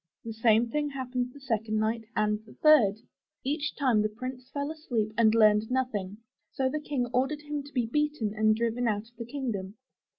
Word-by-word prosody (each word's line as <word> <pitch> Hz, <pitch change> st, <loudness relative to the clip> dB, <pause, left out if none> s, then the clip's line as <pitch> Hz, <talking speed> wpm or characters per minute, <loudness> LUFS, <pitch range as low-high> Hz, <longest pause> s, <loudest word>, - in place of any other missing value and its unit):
The 225 Hz, -, -4 dB
same 225 Hz, +1 st, +3 dB
thing 295 Hz, +1 st, 0 dB
happened 255 Hz, -2 st, -3 dB
the 285 Hz, -, -13 dB
second 225 Hz, -5 st, -1 dB
night 220 Hz, +1 st, 0 dB
and 210 Hz, 0 st, +1 dB
the -, -, -15 dB
third. 225 Hz, -9 st, +5 dB, 0.4 s
Each 295 Hz, +2 st, -2 dB
time 255 Hz, -7 st, +3 dB
the 215 Hz, -, +1 dB
Prince 255 Hz, +3 st, -7 dB
fell 285 Hz, +1 st, -3 dB
asleep 235 Hz, -9 st, -2 dB
and 225 Hz, -1 st, +4 dB
learned 215 Hz, -1 st, +5 dB
nothing, 215 Hz, -7 st, -2 dB, 0.3 s
so 265 Hz, -, 0 dB
the 300 Hz, +3 st, -2 dB
King 280 Hz, -4 st, -1 dB
ordered 280 Hz, +4 st, 0 dB
him 295 Hz, -1 st, -3 dB
to 285 Hz, +1 st, -13 dB
be 250 Hz, -4 st, 0 dB
beaten 295 Hz, -4 st, -1 dB
and 215 Hz, 0 st, +3 dB
driven 235 Hz, +2 st, 0 dB
out 215 Hz, +1 st, -2 dB
of -, -, -39 dB
the 235 Hz, -, -4 dB
kingdom. 225 Hz, -7 st, -4 dB
240 Hz, 195 wpm, -28 LUFS, 215-275 Hz, 0.4 s, third